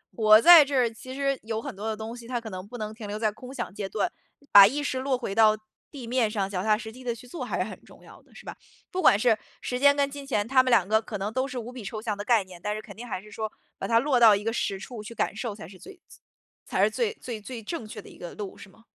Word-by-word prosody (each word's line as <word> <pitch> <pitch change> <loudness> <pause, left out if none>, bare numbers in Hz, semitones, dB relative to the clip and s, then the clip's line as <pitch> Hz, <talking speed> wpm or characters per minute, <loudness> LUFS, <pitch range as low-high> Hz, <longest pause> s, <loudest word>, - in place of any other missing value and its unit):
活 215 -1 +7
在 335 +5 +10
这 280 0 -3
儿， 245 -3 +3
其 255 +3 -10
实 275 -1 -1
有 220 0 -3
很 275 -7 -7
多 210 +3 -5
的 215 -1 -2
东 225 +1 -6
西 235 -1 -11
它 245 -1 -2
可 225 -2 -9
能 185 +1 -7
不 245 - -9
能 215 -1 -5
停 220 -1 -9
留 205 +1 -4
在 215 -1 0
空 250 +4 -11
想 195 - -5
阶 200 -1 -5
段， 210 - -1 0.4
把 200 -1 +10
意 290 +6 -2
识 260 -2 -2
落 265 -1 0
回 235 -5 -4
到 215 -1 +5 0.3
地 270 -5 -8
面 240 -2 +1
上， 205 -3 -1
脚 185 -2 -3
踏 215 0 +3
实 220 0 -8
地 255 +3 -13
地 240 -2 -2
去 250 +2 -14
做 290 - -6
还 - - -3
是 - - +1
很 - - -10
重 - - -18
要 - - -15
的， - - -25
是 - - -13
吧？ - - -7 0.4
不 370 - -2
管 250 - +6
是 220 +1 +3 0.3
时 250 - -3
间 285 +1 +6
跟 280 - +2
金 285 -1 -8
钱 210 -5 0
它 260 0 +5
们 255 - -1
2 195 -6 +4
个 220 +1 +3
可 215 - -6
能 205 +3 -4
都 260 +1 0
是 260 - -7
无 235 +2 -7
比 245 -4 -8
抽 215 +2 -5
象 215 -2 -2
的 205 - -4
概 230 -3 +3
念， 180 -2 -14
但 210 0 -2
是 215 - -5
肯 - - -12
定 240 +3 -9
还 210 - -4
是 210 - -16
说 215 +1 -4 0.3
把 - - -3
它 230 0 +4
落 265 -1 +2
到 220 -3 +8
一 200 - -4
个 225 +1 -1
实 200 -4 -1
处 230 +2 -8
去 230 +2 -9
感 205 - -1
受 220 -1 -4
才 195 - -10
是 185 +1 -14
最 390 -2 -13 0.7
才 - - +1
是 - - +3
最 460 -3 0
最 235 - -7
最 230 +1 -8
正 225 -2 -5
确 - - -9
的 - - -14
一 - - -15
个 175 - -8
路 205 -2 -7
是 195 - -12
吗？ 225 +4 -22
225 Hz, 330 characters per minute, -26 LUFS, 210-255 Hz, 0.7 s, 在